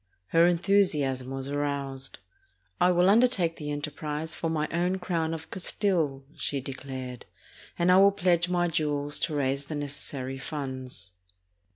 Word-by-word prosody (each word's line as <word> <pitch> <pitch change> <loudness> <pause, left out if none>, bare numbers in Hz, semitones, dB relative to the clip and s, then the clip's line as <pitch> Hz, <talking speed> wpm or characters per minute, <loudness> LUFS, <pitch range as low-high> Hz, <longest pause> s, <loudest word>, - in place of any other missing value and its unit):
Her 165 +1 +5
enthusiasm 170 -8 +2
was 135 0 -4
aroused. 140 -2 -2 0.6
''I 180 - +6
will 180 +1 +4
undertake 200 -6 +3
the 150 -1 -5
enterprise 150 +1 -4
for 165 - -2
my 155 -1 0
own 180 +3 +1
crown 170 -3 -1
of 160 -1 -6
Cas 190 - -2
tile," 160 -10 0
she 140 - -2
declared, 130 -2 -7 0.5
"and 175 +1 +3
I 185 - +7
will 200 +1 +7
pledge 180 -2 +2
my 175 -1 +2
jewels 145 -3 0
to 160 -2 -1
raise 140 0 0
the 155 - -5
necessary 140 -2 -4
funds." 130 - -6
150 Hz, 150 wpm, -28 LUFS, 140-175 Hz, 0.6 s, I